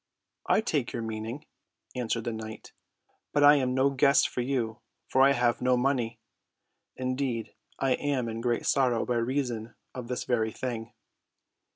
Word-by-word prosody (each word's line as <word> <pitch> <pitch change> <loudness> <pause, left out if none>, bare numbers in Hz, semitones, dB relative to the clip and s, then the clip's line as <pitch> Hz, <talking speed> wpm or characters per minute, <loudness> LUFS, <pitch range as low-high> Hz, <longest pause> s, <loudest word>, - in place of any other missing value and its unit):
"I - - +4
take 145 - -1
your 115 - -3
meaning," 110 +5 -5 0.5
answered 115 -2 -1
the 115 - -3
knight, 110 0 -8 0.6
"but 145 - +3
I 145 +1 +8
am 130 -2 0
no 135 +1 +3
guest 140 +1 +4
for 125 - -3
you, 120 -3 -2 0.3
for 130 - +2
I 140 +1 +6
have 120 -2 +1
no 125 0 +3
money. 125 -3 0 0.8
Indeed, 130 -2 -2 0.2
I 135 - 0
am 130 -2 0
in 115 0 -4
great 120 -1 0
sorrow 125 -4 +2
by 120 - 0
reason 120 -2 -2 0.2
of 125 -2 -6
this 125 0 -3
very 110 -3 0
thing. 115 -1 -5
125 Hz, 160 wpm, -28 LUFS, 115-135 Hz, 0.8 s, I